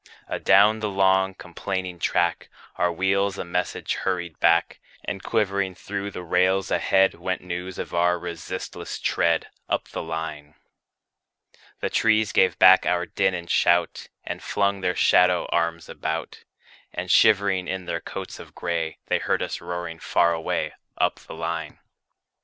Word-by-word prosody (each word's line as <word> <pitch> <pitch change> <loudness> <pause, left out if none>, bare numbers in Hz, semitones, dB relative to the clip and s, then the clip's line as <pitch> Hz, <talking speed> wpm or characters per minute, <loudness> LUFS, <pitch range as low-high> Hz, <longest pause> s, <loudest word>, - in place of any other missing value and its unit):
Adown 105 +3 +4
the 105 -1 -2
long, 95 -1 +2
complaining 90 0 -5
track, 85 0 0 0.3
Our 90 0 +1
wheels 95 +3 0
a - - -4
message 90 +1 -2
hurried 85 -4 -3
back; 85 0 +3 0.3
And 95 - -4
quivering 100 -4 0
through 100 +2 -5
the 90 -2 -7
rails 95 +3 +1
ahead, 95 0 +3
Went 90 +2 -4
news 90 +1 -5
of - - -6
our 90 +1 +2
resistless 85 -2 -6
tread, 85 -1 +1 0.2
Up - - -1
the - - -5
line. 80 -2 -6 1.3
The - - -1
trees 110 -1 +3
gave 95 - +3
back 95 0 +7
our 90 0 +1
din 95 +1 0
and 85 -1 -6
shout, 85 0 +2 0.2
And - - -5
flung 100 -1 0
their 90 -1 0
shadow 90 -1 +4
arms 85 -1 0
about; 80 +1 -5 0.5
And - - -3
shivering 100 -3 +4
in 95 -1 -4
their 85 - -3
coats - - -7
of - - -13
gray, 85 -2 -2
They - - +1
heard - - 0
us - - -4
roaring 85 -2 -5
far 85 0 +2
away, 80 -1 -2 0.2
Up - - +1
the - - -11
line. 80 0 -4
90 Hz, 150 wpm, -24 LUFS, 85-95 Hz, 1.3 s, back